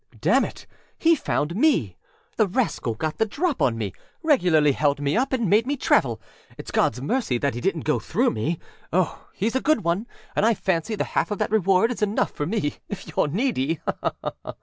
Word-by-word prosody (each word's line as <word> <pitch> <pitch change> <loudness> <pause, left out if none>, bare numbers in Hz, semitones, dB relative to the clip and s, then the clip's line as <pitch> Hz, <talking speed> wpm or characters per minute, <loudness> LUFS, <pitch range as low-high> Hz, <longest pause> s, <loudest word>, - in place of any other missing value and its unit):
â - - -19
âDamn - - +3
it! - - -14 0.3
he 335 0 +4
found 170 - -1
me. 305 +9 +2 0.4
The 215 - +3
rascal 185 - -1
got 155 +7 -3
the 220 - +4
drop 310 - -1
on 115 -3 +2
meâregularly 155 - +1
held 145 0 +1
me 145 0 0
up 260 +4 +1
and 240 -5 +1
made 215 +6 +3
me 285 +1 0
travel. 120 - +2 0.4
Itâs - - -8
Godâs 125 - +1
mercy 225 - 0
that 140 +1 0
he 120 - -5
didnât - - 0
go - - +1
through - - +1
me. 145 +10 -1 0.3
Oh, 180 0 0
heâs 220 +4 +1
a 260 - +1
good 295 -8 +2
one, 175 +7 0 0.3
and - - +2
I 225 +1 +4
fancy 190 +4 -1
the - - 0
half - - -1
of 205 - -2
that - - -1
reward 195 +1 +3
is 240 - -5
enough 210 0 +1
for 145 - -3
me 170 -7 -1
if 205 -2 -6
youâre 150 - 0
needy. 165 - 0
190 Hz, 200 wpm, -24 LUFS, 145-235 Hz, 0.4 s, he